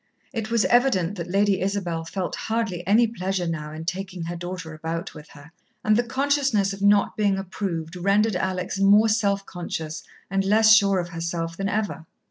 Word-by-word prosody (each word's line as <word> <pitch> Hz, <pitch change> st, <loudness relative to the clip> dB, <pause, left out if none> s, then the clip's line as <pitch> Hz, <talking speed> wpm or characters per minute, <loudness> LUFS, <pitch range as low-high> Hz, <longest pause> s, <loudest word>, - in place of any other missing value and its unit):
It 225 Hz, -2 st, -3 dB
was 230 Hz, -2 st, +2 dB
evident 240 Hz, -8 st, +3 dB
that 170 Hz, 0 st, -5 dB
Lady 200 Hz, +1 st, +2 dB
Isabel 185 Hz, -4 st, -2 dB
felt 180 Hz, +2 st, -4 dB
hardly 220 Hz, -6 st, -2 dB
any 220 Hz, +4 st, +5 dB
pleasure 190 Hz, -4 st, -2 dB
now 155 Hz, -2 st, -4 dB
in 160 Hz, +1 st, -7 dB
taking 185 Hz, 0 st, -4 dB
her 170 Hz, +1 st, -4 dB
daughter 175 Hz, -2 st, -6 dB
about 165 Hz, +3 st, -5 dB
with 150 Hz, 0 st, -12 dB
her, 150 Hz, +1 st, -15 dB, 0.3 s
and 215 Hz, -, +4 dB
the 235 Hz, -, +4 dB
consciousness 260 Hz, -5 st, +1 dB
of 195 Hz, -, -9 dB
not 205 Hz, 0 st, +3 dB
being 200 Hz, -2 st, +1 dB
approved 180 Hz, -3 st, -4 dB
rendered 200 Hz, +3 st, +2 dB
Alex 185 Hz, +1 st, -2 dB
more 205 Hz, +3 st, +5 dB
self 200 Hz, -2 st, +1 dB
conscious 160 Hz, -3 st, -5 dB, 0.3 s
and 195 Hz, 0 st, 0 dB
less 220 Hz, +2 st, +5 dB
sure 200 Hz, -3 st, +5 dB
of 175 Hz, -1 st, -2 dB
herself 165 Hz, 0 st, -4 dB
than 195 Hz, +2 st, -2 dB
ever. 205 Hz, -7 st, -3 dB
195 Hz, 180 wpm, -24 LUFS, 170-210 Hz, 0.3 s, any